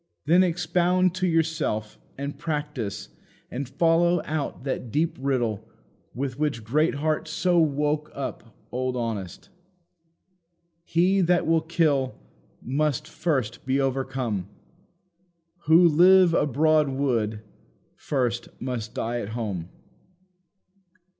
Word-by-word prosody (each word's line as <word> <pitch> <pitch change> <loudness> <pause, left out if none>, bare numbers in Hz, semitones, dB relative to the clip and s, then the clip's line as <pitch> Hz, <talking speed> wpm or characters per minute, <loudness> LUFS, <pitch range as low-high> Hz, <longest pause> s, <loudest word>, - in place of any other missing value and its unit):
Then 170 +5 +5
expound 180 +1 +1
to 185 0 +1
yourself, 160 -10 -1 0.2
and 140 +1 -4
practise, 145 -10 -4 0.4
and 130 +1 -4
follow 170 +4 +3
out 150 -4 -3
that 130 -3 -3
deep 160 +5 0
riddle 120 -6 0 0.5
with 130 +1 -4
which 145 -7 -1
Greatheart 155 +5 0
so 175 +2 +1
woke 150 0 +1
up 130 -4 -6 0.2
old 130 0 -2
Honest: 110 -7 -4 1.3
"He 180 +4 +2
that 175 0 +2
will 165 0 +3
kill, 155 -5 +1 0.5
must 145 +1 -1
first 130 -9 -2
be 135 +1 0
overcome; 130 -7 -2 1.2
Who 165 +2 +7
live 180 +2 +6
abroad 150 +1 +3
would, 115 -6 -1 0.5
first 120 -4 -2
must 120 -4 -4
die 120 +1 -2
at 100 - -6
home. 95 -7 -4
140 Hz, 105 wpm, -25 LUFS, 120-165 Hz, 1.3 s, Who